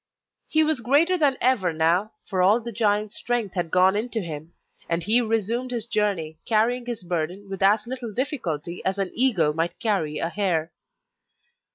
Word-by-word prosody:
He 315 Hz, 0 st, +3 dB
was 310 Hz, -5 st, +1 dB
greater 290 Hz, +10 st, +3 dB
than 290 Hz, -6 st, +2 dB
ever 235 Hz, -9 st, +2 dB
now, 170 Hz, +7 st, +1 dB
for 185 Hz, -1 st, -1 dB
all 200 Hz, +6 st, +4 dB
the 235 Hz, 0 st, -6 dB
giant's 210 Hz, -1 st, 0 dB
strength 240 Hz, -5 st, -2 dB
had 175 Hz, -3 st, -2 dB
gone 185 Hz, +3 st, +4 dB
into 225 Hz, +2 st, -1 dB
him; 160 Hz, -3 st, -7 dB, 0.4 s
and 165 Hz, 0 st, -1 dB
he 220 Hz, +6 st, +6 dB
resumed 225 Hz, +2 st, -1 dB
his 235 Hz, -3 st, -3 dB
journey, 195 Hz, -9 st, -1 dB
carrying 240 Hz, +3 st, +1 dB
his 235 Hz, -5 st, -4 dB
burden 175 Hz, +3 st, -3 dB
with 195 Hz, -1 st, -7 dB
as 205 Hz, +2 st, +3 dB
little 245 Hz, -2 st, -6 dB
difficulty 185 Hz, -, -3 dB
as 190 Hz, +1 st, -1 dB
an 195 Hz, -2 st, -2 dB
eagle 200 Hz, -13 st, +3 dB
might 165 Hz, +2 st, -2 dB
carry 195 Hz, -11 st, -1 dB
a 165 Hz, -, -2 dB
hare. 170 Hz, -4 st, -1 dB
205 Hz, 175 wpm, -24 LUFS, 175-240 Hz, 0.4 s, he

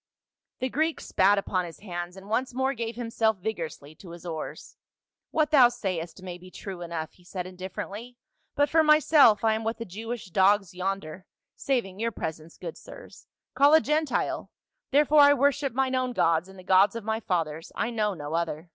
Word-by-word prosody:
The 255 Hz, -, 0 dB
Greek 315 Hz, +5 st, 0 dB
spat 200 Hz, +2 st, +3 dB
upon 185 Hz, -2 st, -1 dB
his 170 Hz, -, -11 dB
hands 175 Hz, -2 st, -6 dB
and 190 Hz, +1 st, -12 dB
once 245 Hz, +3 st, -1 dB
more 265 Hz, +1 st, +1 dB
gave 230 Hz, -2 st, -4 dB
himself 230 Hz, -2 st, 0 dB
vigorously 165 Hz, -7 st, -5 dB
to 185 Hz, -, -13 dB
his 170 Hz, +1 st, -11 dB
oars. 160 Hz, -3 st, -6 dB, 0.3 s
" -, -, -65 dB
What 310 Hz, -1 st, +1 dB
thou 260 Hz, -5 st, +7 dB
sayst 185 Hz, -6 st, -5 dB
may 180 Hz, -1 st, -7 dB
be 185 Hz, +1 st, -13 dB
true 185 Hz, -1 st, -8 dB
enough," 165 Hz, -2 st, -5 dB
he 180 Hz, -, -23 dB
said 180 Hz, 0 st, -5 dB
indifferently; 195 Hz, +6 st, -7 dB, 0.4 s
"but 290 Hz, 0 st, +3 dB
for 320 Hz, +2 st, +4 dB
myself 305 Hz, -7 st, +5 dB
I 220 Hz, -1 st, +4 dB
am 220 Hz, +1 st, -2 dB
what 225 Hz, +1 st, -2 dB
the 230 Hz, -, -6 dB
Jewish 220 Hz, +1 st, -7 dB
dogs 195 Hz, 0 st, +3 dB
yonder 185 Hz, -1 st, -4 dB
— -, -, -61 dB
saving 230 Hz, -8 st, -2 dB
your 230 Hz, +1 st, 0 dB
presence, 160 Hz, -4 st, -6 dB
good 170 Hz, -3 st, -7 dB
sirs -, -, -13 dB
— -, -, -65 dB
call 285 Hz, +3 st, +6 dB
a -, -, +8 dB
Gentile, 305 Hz, -2 st, -1 dB, 0.4 s
therefore 295 Hz, +2 st, +4 dB
I 285 Hz, 0 st, +8 dB
worship 280 Hz, 0 st, +1 dB
mine 260 Hz, +2 st, 0 dB
own 255 Hz, -1 st, 0 dB
gods 165 Hz, -2 st, +1 dB
and 190 Hz, -, -14 dB
the 185 Hz, -, -12 dB
gods 190 Hz, +3 st, +4 dB
of 230 Hz, -, -5 dB
my 220 Hz, +1 st, -1 dB
fathers; 165 Hz, -6 st, -2 dB
I 235 Hz, -, -1 dB
know 210 Hz, -3 st, 0 dB
no 145 Hz, -1 st, -6 dB
other." 165 Hz, 0 st, -2 dB
205 Hz, 200 wpm, -27 LUFS, 180-255 Hz, 0.4 s, a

